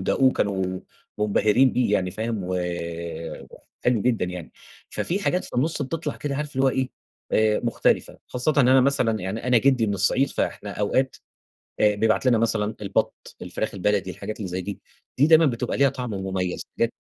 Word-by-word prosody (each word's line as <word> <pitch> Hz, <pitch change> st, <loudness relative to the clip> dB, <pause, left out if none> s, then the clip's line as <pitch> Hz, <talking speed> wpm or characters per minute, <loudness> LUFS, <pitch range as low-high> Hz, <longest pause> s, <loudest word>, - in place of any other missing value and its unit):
وداقوه 115 Hz, +7 st, +1 dB
وكانوا 95 Hz, -5 st, -1 dB, 0.4 s
منبهرين 105 Hz, +4 st, +3 dB
بيه 125 Hz, -4 st, +1 dB
يعني 90 Hz, -2 st, 0 dB
فاهم، 110 Hz, +2 st, -3 dB
و 90 Hz, +1 st, -2 dB, 1.3 s
حلو 125 Hz, -3 st, +3 dB
جدًا 120 Hz, -6 st, +1 dB
يعني، 90 Hz, -2 st, -7 dB, 0.4 s
ففيه 180 Hz, -, -1 dB
حاجات 180 Hz, -2 st, 0 dB
في -, -, -7 dB
النُصّ 150 Hz, +4 st, 0 dB
بتطلع 150 Hz, +2 st, -4 dB
كده 140 Hz, -2 st, -3 dB
عارف 150 Hz, -1 st, -4 dB
اللي 135 Hz, -, +2 dB
هو -, -, +5 dB, 0.6 s
إيه 110 Hz, -1 st, +3 dB
مختلفة 115 Hz, -, +1 dB
خاصةً 125 Hz, +5 st, 0 dB
إن 130 Hz, -3 st, +5 dB
أنا 130 Hz, +1 st, +6 dB
مثلًا 125 Hz, -5 st, +2 dB
يعني 100 Hz, +6 st, -4 dB
أنا 125 Hz, -1 st, +5 dB
جدي 130 Hz, -2 st, +3 dB
من 100 Hz, -, 0 dB
الصعيد، 100 Hz, +8 st, +2 dB
فإحنا -, -, -3 dB
أوقات 130 Hz, +6 st, 0 dB, 0.6 s
آآ، 105 Hz, -1 st, +4 dB
بيبعت 110 Hz, +4 st, +1 dB
لنا 120 Hz, -3 st, +4 dB
مثلًا 110 Hz, -1 st, 0 dB
البط، 100 Hz, -1 st, -2 dB
الفراخ -, -, -3 dB
البلدي، 100 Hz, 0 st, 0 dB
الحاجات 100 Hz, +5 st, -6 dB
اللي 100 Hz, -4 st, -4 dB
زي 90 Hz, +1 st, -3 dB
دي، 100 Hz, +1 st, -6 dB, 0.4 s
دي 140 Hz, -, +6 dB
دايمًا 160 Hz, 0 st, +6 dB
بتبقى 125 Hz, -2 st, -1 dB
ليها 140 Hz, 0 st, +5 dB
طعم 125 Hz, -2 st, -5 dB
مميز 95 Hz, -2 st, -2 dB, 0.2 s
بجد. -, -, +2 dB
115 Hz, 175 wpm, -24 LUFS, 100-130 Hz, 1.3 s, أنا